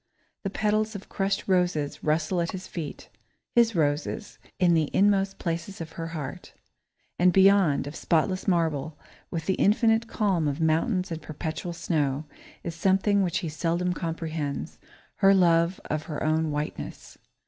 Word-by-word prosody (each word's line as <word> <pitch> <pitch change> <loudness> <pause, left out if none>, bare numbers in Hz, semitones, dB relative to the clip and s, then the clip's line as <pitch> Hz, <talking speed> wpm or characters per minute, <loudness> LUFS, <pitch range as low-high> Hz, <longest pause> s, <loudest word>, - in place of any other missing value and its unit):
The 195 - -2
petals 215 +2 0
of 200 - -8
crushed 195 0 -1
roses 175 -6 0
rustle 160 +3 +1
at 170 - -2
his 190 0 -6
feet 160 -4 -7 0.4
his 230 -2 +4
roses 150 +6 -1 0.2
in 180 -3 +4
the 160 -3 +2
inmost 195 -1 +3
places 170 +3 -4
of 160 -1 -6
her 165 0 -5
heart. 155 -5 -7 0.6
And 180 +1 +5
beyond, 190 -5 +5
of 145 +2 -7
spotless 185 +4 0
marble, 160 -4 0 0.3
with 165 -2 -4
the 190 - +2
infinite 225 +2 +3
calm 190 -9 +1
of 145 +1 -2
mountains 175 +4 +1
and 160 -1 -4
perpetual 155 +3 -5
snow, 150 -4 -1 0.4
is 170 - -4
something 195 +4 +2
which 180 -2 0
he - - -2
seldom 170 +3 -1
comprehends 160 -4 -4 0.4
her 195 0 +6
love 170 -1 +3
of 155 0 -3
her 150 -3 -4
own 155 0 +1
whiteness. 150 0 -5
170 Hz, 150 wpm, -27 LUFS, 155-195 Hz, 0.6 s, her